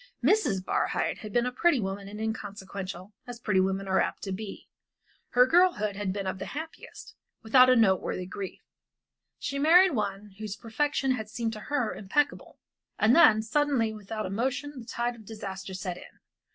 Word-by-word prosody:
Mrs. 200 Hz, -, +2 dB
Barhyte -, -, 0 dB
had 215 Hz, -2 st, -8 dB
been 240 Hz, +3 st, +2 dB
a 250 Hz, -, -1 dB
pretty 290 Hz, +2 st, +2 dB
woman 195 Hz, -1 st, -4 dB
and 210 Hz, +1 st, -8 dB
inconsequential, 200 Hz, -3 st, -5 dB
as 245 Hz, -1 st, -7 dB
pretty 210 Hz, -5 st, +1 dB
woman 190 Hz, +1 st, 0 dB
are 190 Hz, 0 st, +3 dB
apt -, -, -3 dB
to 195 Hz, -, -4 dB
be. 200 Hz, +1 st, -7 dB, 0.6 s
Her 250 Hz, +1 st, +5 dB
girlhood 330 Hz, -, +3 dB
had 200 Hz, -2 st, -2 dB
been 200 Hz, 0 st, -4 dB
of 190 Hz, 0 st, -3 dB
the -, -, -5 dB
happiest, 320 Hz, +1 st, -9 dB, 0.3 s
without 255 Hz, +3 st, +6 dB
a 255 Hz, -, +6 dB
noteworthy 190 Hz, -4 st, +2 dB
grief. 190 Hz, +1 st, -7 dB, 0.7 s
She 275 Hz, -, -3 dB
married 355 Hz, +6 st, +6 dB
one 205 Hz, -3 st, -3 dB
whose 215 Hz, -2 st, -5 dB
perfection 270 Hz, +4 st, -1 dB
had 220 Hz, -4 st, -2 dB
seemed 225 Hz, 0 st, -3 dB
to 215 Hz, -, -7 dB
her 285 Hz, -6 st, 0 dB
impeccable, 275 Hz, +9 st, -1 dB, 0.4 s
and 225 Hz, +4 st, +4 dB
then 220 Hz, -10 st, +6 dB
suddenly 255 Hz, -2 st, +1 dB
without 215 Hz, +1 st, -5 dB
a 185 Hz, -, -5 dB
monition 260 Hz, +6 st, -2 dB
the 230 Hz, -, -9 dB
tide 240 Hz, 0 st, -2 dB
of 225 Hz, -, -14 dB
disaster 195 Hz, -3 st, -7 dB
set 185 Hz, -2 st, -4 dB
in. -, -, -14 dB
220 Hz, 180 wpm, -28 LUFS, 195-255 Hz, 0.7 s, without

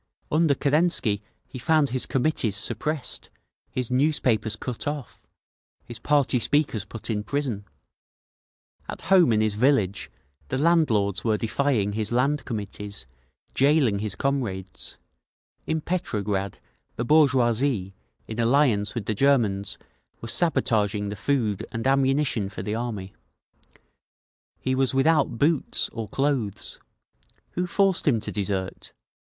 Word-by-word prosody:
Under 155 Hz, -2 st, +3 dB
Kerensky 140 Hz, -, +2 dB, 0.3 s
he 130 Hz, -, -8 dB
found 155 Hz, +1 st, +2 dB
his 130 Hz, 0 st, 0 dB
Committees 125 Hz, -6 st, 0 dB
suppressed, 125 Hz, +7 st, -2 dB, 0.4 s
his 125 Hz, -1 st, -3 dB
newspapers 125 Hz, -6 st, +2 dB
cut 120 Hz, +3 st, -5 dB
off, 145 Hz, -3 st, -5 dB, 0.6 s
his 120 Hz, -2 st, -9 dB
party 140 Hz, -2 st, +2 dB
speakers 135 Hz, -6 st, +1 dB
put 115 Hz, 0 st, -6 dB
in 105 Hz, -1 st, -1 dB
prison…. 125 Hz, -5 st, -2 dB, 1.2 s
At -, -, -6 dB
home 175 Hz, -9 st, +6 dB
in 110 Hz, -1 st, +3 dB
his 110 Hz, -1 st, +2 dB
village, 105 Hz, -4 st, +1 dB, 0.4 s
the -, -, -2 dB
landlords 130 Hz, -, +2 dB
were 110 Hz, -2 st, +2 dB
defying 115 Hz, -2 st, 0 dB
his 110 Hz, 0 st, -3 dB
Land 130 Hz, +3 st, +1 dB
Committees, 105 Hz, -, -5 dB, 0.5 s
jailing 135 Hz, -7 st, +3 dB
his 105 Hz, -2 st, -3 dB
comrades…. 100 Hz, -9 st, -3 dB, 0.7 s
In 160 Hz, 0 st, 0 dB
Petrograd 105 Hz, -, -2 dB, 0.4 s
the 120 Hz, -, -2 dB
bourgeoisie, 125 Hz, -7 st, +3 dB, 0.3 s
in 110 Hz, +1 st, -6 dB
alliance 115 Hz, -4 st, +2 dB
with 115 Hz, -4 st, -3 dB
the 110 Hz, -, 0 dB
Germans, 105 Hz, -6 st, +1 dB, 0.4 s
were 115 Hz, -, -7 dB
sabotaging 110 Hz, -, +1 dB
the 105 Hz, -, -4 dB
food 110 Hz, -3 st, 0 dB
and 115 Hz, +1 st, -4 dB
ammunition 135 Hz, -5 st, +2 dB
for 100 Hz, -, -7 dB
the 105 Hz, -, -3 dB
Army…. 110 Hz, -5 st, -4 dB, 1.5 s
He 130 Hz, -, -1 dB
was 130 Hz, 0 st, +1 dB
without 140 Hz, -3 st, +3 dB
boots, 145 Hz, +2 st, +1 dB
or 115 Hz, -3 st, -5 dB
clothes…. 135 Hz, -6 st, -1 dB, 0.7 s
Who 180 Hz, +1 st, -2 dB
forced 195 Hz, -2 st, +1 dB
him 120 Hz, -6 st, +4 dB
to -, -, -5 dB
desert? 95 Hz, -2 st, -3 dB
120 Hz, 125 wpm, -25 LUFS, 105-140 Hz, 1.5 s, home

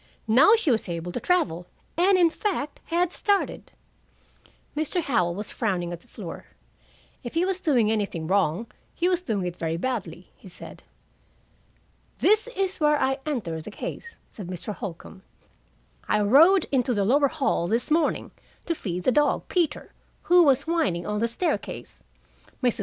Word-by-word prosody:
Now 275 Hz, -, +6 dB
she 400 Hz, -11 st, +1 dB
was 220 Hz, -5 st, 0 dB
able 170 Hz, +1 st, -4 dB
to 245 Hz, -, -3 dB
travel, 180 Hz, -, 0 dB, 0.3 s
and, 370 Hz, +3 st, +4 dB
in 340 Hz, -2 st, +4 dB
fact, 335 Hz, -7 st, -3 dB
had 345 Hz, +1 st, 0 dB
started." 405 Hz, 0 st, -1 dB, 1.0 s
Mr. 310 Hz, +4 st, -1 dB
Howell 180 Hz, -11 st, +1 dB
was 210 Hz, +2 st, -5 dB
frowning 180 Hz, -6 st, -2 dB
at 170 Hz, -, -7 dB
the -, -, -20 dB
floor. -, -, -8 dB, 0.8 s
"If 240 Hz, -, -7 dB
he 340 Hz, +2 st, +2 dB
was 380 Hz, -1 st, -1 dB
doing 250 Hz, -, +2 dB
anything 200 Hz, -7 st, -2 dB
wrong, 190 Hz, +2 st, +1 dB, 0.3 s
he 350 Hz, -, +1 dB
was 365 Hz, -1 st, +2 dB
doing 215 Hz, -, -2 dB
it 175 Hz, -1 st, -4 dB
very 165 Hz, 0 st, -2 dB
badly," 185 Hz, -5 st, -4 dB
he -, -, -16 dB
said. 180 Hz, -, -9 dB, 1.4 s
"This 430 Hz, +3 st, +3 dB
is 385 Hz, -1 st, -1 dB
where 300 Hz, -1 st, +3 dB
I 265 Hz, +1 st, +1 dB
entered 170 Hz, -, -3 dB
the -, -, -6 dB
case," 465 Hz, -, -7 dB, 0.2 s
said 200 Hz, -5 st, -8 dB
Mr. 180 Hz, +2 st, -5 dB
Holcombe, 190 Hz, -2 st, -8 dB, 0.9 s
"I 210 Hz, -, +2 dB
rowed 315 Hz, -, +6 dB
into 250 Hz, -3 st, +1 dB
the 200 Hz, -1 st, +1 dB
lower 280 Hz, +6 st, +4 dB
hall 275 Hz, -, 0 dB
this 230 Hz, -, -1 dB
morning, 325 Hz, +1 st, +1 dB, 0.3 s
to 335 Hz, -, 0 dB
feed 180 Hz, -, -4 dB
the 255 Hz, -, +3 dB
dog, 295 Hz, +3 st, +1 dB
Peter, 340 Hz, -5 st, -1 dB, 0.3 s
who 355 Hz, 0 st, +6 dB
was 280 Hz, -4 st, +4 dB
whining 315 Hz, -, 0 dB
on 210 Hz, 0 st, -2 dB
the 230 Hz, -, +1 dB
staircase. 285 Hz, +10 st, -3 dB, 0.6 s
Mrs. 245 Hz, -3 st, +2 dB
250 Hz, 165 wpm, -25 LUFS, -, 1.4 s, Now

